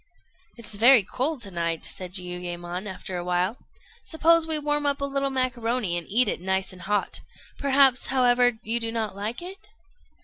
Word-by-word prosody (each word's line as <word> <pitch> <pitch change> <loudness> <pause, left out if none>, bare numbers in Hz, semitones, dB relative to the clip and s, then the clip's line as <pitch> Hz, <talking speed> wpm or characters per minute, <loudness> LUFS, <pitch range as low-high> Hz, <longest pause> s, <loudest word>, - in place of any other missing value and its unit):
"It's 230 -2 -7
very 235 0 +7
cold 265 +6 -2
to 200 - -6
night," 170 -2 -2
said 180 -1 -6
Jiuyémon, 180 0 -4
after 185 0 -6
a 175 - -4
while; 180 +5 0 0.4
"suppose 330 0 +3
we 315 -1 +1
warm 295 0 0
up 280 0 0
a 280 - -1
little 275 0 -1
macaroni, 245 -6 -1
and 170 -1 -4
eat 235 +4 +4
it 185 - -1
nice 190 +1 -1
and 180 - -13
hot. 205 +4 -1 0.4
Perhaps, 270 -2 +4
however, 245 -1 +4
you 230 +2 0
do 230 -1 -3
not 220 -4 -3
like 215 +9 -4
it?" 385 +3 -9
230 Hz, 175 wpm, -25 LUFS, 185-270 Hz, 0.4 s, very